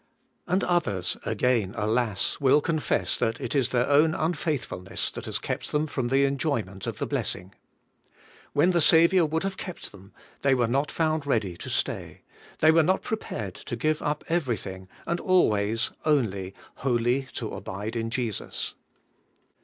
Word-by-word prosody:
And 185 +2 +1
others, 100 - 0
again, 115 -6 +1
alas! 110 -1 0
will 140 +1 +5
confess 155 0 0
that 115 +1 0
it - - -3
is 135 -4 +2
their 125 -1 +1
own 150 +3 +4
unfaithfulness 155 - -2
that - - -7
has - - -1
kept - - -4
them 150 +1 +1
from 130 -5 -2
the 135 +2 +3
enjoyment 130 -9 -2
of - - -3
the - - -2
blessing. 90 +2 -2 1.0
When 175 +6 +4
the 170 -2 +2
Saviour 170 +2 +6
would 160 +3 -1
have 195 -1 -3
kept 180 -4 -7
them, 100 0 -15 0.3
they 135 -1 +4
were 125 -2 +2
not 135 +5 0
found 155 -2 0
ready 105 -9 0
to - - -7
stay; - - -2 0.4
they 155 - +7
were 165 +1 +5
not 185 +4 +1
prepared 110 - -4
to 120 - -6
give 155 +6 0
up 150 0 -2
everything, 110 - -2 0.2
and 170 +1 -1
always, 110 - +2
only, 100 -11 0 0.2
wholly 125 +1 +1
to - - -4
abide 105 +5 -5
in 115 -1 -1
Jesus. 115 -3 -3
135 Hz, 160 wpm, -26 LUFS, 110-155 Hz, 1.0 s, they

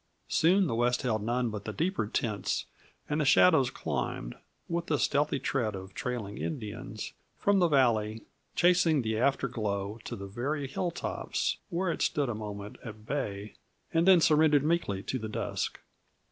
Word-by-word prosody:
Soon 185 +4 +4
the 120 - -1
west 120 +2 +1
held 110 -4 0
none 120 +2 0
but 105 -1 -6
the 110 - -3
deeper 160 - -1
tints, 105 -3 -1 0.4
and 150 +1 0
the - - +3
shadows 140 -2 +5
climbed, - - -3 0.3
with 170 0 -2
the 150 - +2
stealthy 145 +1 +1
tread 120 -6 -1
of 95 0 -8
trailing 110 -4 -4
Indians, 110 -6 -5 0.2
from 200 -1 +3
the 175 - +5
valley, 115 -7 +2 0.3
chasing 170 -5 +4
the 110 -1 -1
after 135 +2 +2
glow 105 -3 -3
to - - -4
the 100 - -7
very 135 +8 -3
hilltops, 170 +5 -2
where 180 -1 0
it - - -4
stood 145 -4 +1
a - - -1
moment 105 -1 -7
at 110 -1 -9
bay 105 -6 -3 0.4
and 165 +2 +3
then 185 -2 +8
surrendered 150 -2 +5
meekly 150 - 0
to 130 - -2
the 110 -1 -5
dusk. - - -3
125 Hz, 165 wpm, -30 LUFS, 105-155 Hz, 0.4 s, then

